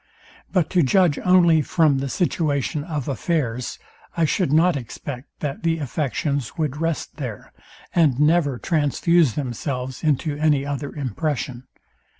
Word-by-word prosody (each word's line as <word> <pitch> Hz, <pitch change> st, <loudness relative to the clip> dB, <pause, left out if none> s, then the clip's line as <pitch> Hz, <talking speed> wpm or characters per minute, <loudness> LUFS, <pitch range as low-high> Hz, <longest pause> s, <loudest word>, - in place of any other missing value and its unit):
But 180 Hz, -5 st, +1 dB
to 180 Hz, -, +4 dB
judge 170 Hz, +1 st, +3 dB
only 175 Hz, -3 st, +5 dB
from 155 Hz, -4 st, +2 dB
the 135 Hz, 0 st, -3 dB
situation 150 Hz, -3 st, 0 dB
of 150 Hz, -5 st, -4 dB
affairs, 130 Hz, -4 st, -2 dB, 0.4 s
I 165 Hz, -, +3 dB
should 165 Hz, 0 st, 0 dB
not 165 Hz, +2 st, +4 dB
expect, 130 Hz, +1 st, -7 dB
that 145 Hz, -2 st, -3 dB
the 165 Hz, -1 st, +1 dB
affections 140 Hz, -2 st, -2 dB
would 150 Hz, -4 st, -1 dB
rest 165 Hz, -2 st, -2 dB
there, 125 Hz, -9 st, -7 dB, 0.4 s
and 150 Hz, -7 st, +3 dB
never 150 Hz, -3 st, +3 dB
transfuse 155 Hz, -, +2 dB
themselves 130 Hz, 0 st, -4 dB
into 150 Hz, 0 st, +1 dB
any 150 Hz, -2 st, +2 dB
other 145 Hz, 0 st, -4 dB
impression. 135 Hz, -2 st, -3 dB
150 Hz, 135 wpm, -22 LUFS, 135-165 Hz, 0.4 s, only